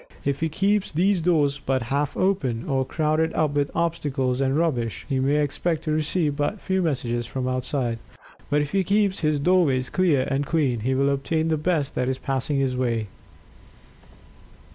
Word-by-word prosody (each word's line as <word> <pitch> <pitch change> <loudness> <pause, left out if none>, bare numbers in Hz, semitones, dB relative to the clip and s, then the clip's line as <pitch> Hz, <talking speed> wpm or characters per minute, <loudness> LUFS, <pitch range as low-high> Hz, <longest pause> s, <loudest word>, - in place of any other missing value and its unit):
If 140 0 0
he 160 - 0
keeps 200 +5 +1
these 185 +3 +2
doors 145 -5 +2
but 130 -2 0
half 145 0 -1
open, 140 -12 0
or 135 -3 +1
crowded 155 +3 0
up 155 -2 +2
with 145 0 0
obstacles 145 -6 -1
and 135 +1 +1
rubbish, 125 -9 -1
he 135 -3 0
may 140 +3 +2
expect 160 +3 -2
to 155 - -2
receive 155 0 0
but 145 +8 -1
few 190 0 0
messages 120 -7 -1
from 130 +1 -3
outside. 130 -2 -2 0.5
But 150 +1 +2
if 145 - -6
he 195 -1 +2
keeps 200 +1 +1
his 155 -2 +1
doorways 145 -5 +2
clear, 165 -8 +2
and 140 0 0
clean, 140 -6 0
he 130 +5 0
will 140 +1 +2
obtain 155 +4 0
the 160 - +2
best 155 -3 0
that 125 0 -1
is 130 - -1
passing 135 +2 -2
his 135 -2 0
way. 115 -4 -1
145 Hz, 180 wpm, -24 LUFS, 130-165 Hz, 0.5 s, these